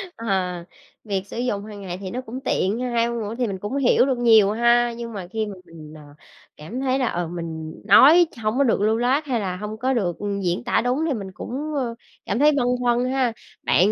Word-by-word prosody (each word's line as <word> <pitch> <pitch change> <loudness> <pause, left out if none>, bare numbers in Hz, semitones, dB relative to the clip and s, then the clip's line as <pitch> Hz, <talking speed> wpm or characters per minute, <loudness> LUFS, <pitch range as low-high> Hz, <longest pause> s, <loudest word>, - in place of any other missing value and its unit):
Ờ, 190 -5 -1 0.5
việc 200 -3 -2
sử - - -8
dụng 210 -5 -2
hàng 205 -2 -9
ngày 180 -2 -5
thì 185 - -6
nó 255 - -3
cũng 255 +1 -7
tiện 205 +5 0
ha, 250 0 -2
2 235 0 +1
ngôn 235 0 -3
ngữ 215 +1 -4
mình 190 -2 -4
cũng 210 +8 -4
hiểu 255 -1 +4
được 260 -3 0
nhiều 220 -4 +5
ha, 235 +1 +3
nhưng 235 -1 -6
mà 185 -4 -6
khi 220 +3 -2
mà 205 -2 -7
mình, 155 -2 -12
ờ, 155 - -12 0.6
cảm 210 +12 -7
thấy 265 0 0
là, 255 - +1
ờ, 175 -4 -2
mình 160 -2 -6
nói 310 - +7 0.2
hổng 215 +4 0
có 280 - +4
được 225 -5 +1
lưu 220 +2 +2
loát 260 +6 +1
hay 250 -5 -1
là 185 -3 -3
hông 210 +2 -6
có 260 +3 0
được, 180 -8 -1
ừm, 200 -1 -3
diễn 180 +4 -1
tả 240 - +1
đúng 255 +6 0
thì 290 - 0
mình 195 -4 -6
cũng, 295 +9 -5
ơ, 245 -4 -2 0.3
cảm 205 +5 -1
thấy 300 +1 +6
băn 275 -4 +1 0.2
khoăn 245 0 +2
ha. 255 -3 0 0.3
Bạn 195 +4 +3
225 Hz, 240 wpm, -23 LUFS, 195-250 Hz, 0.6 s, nói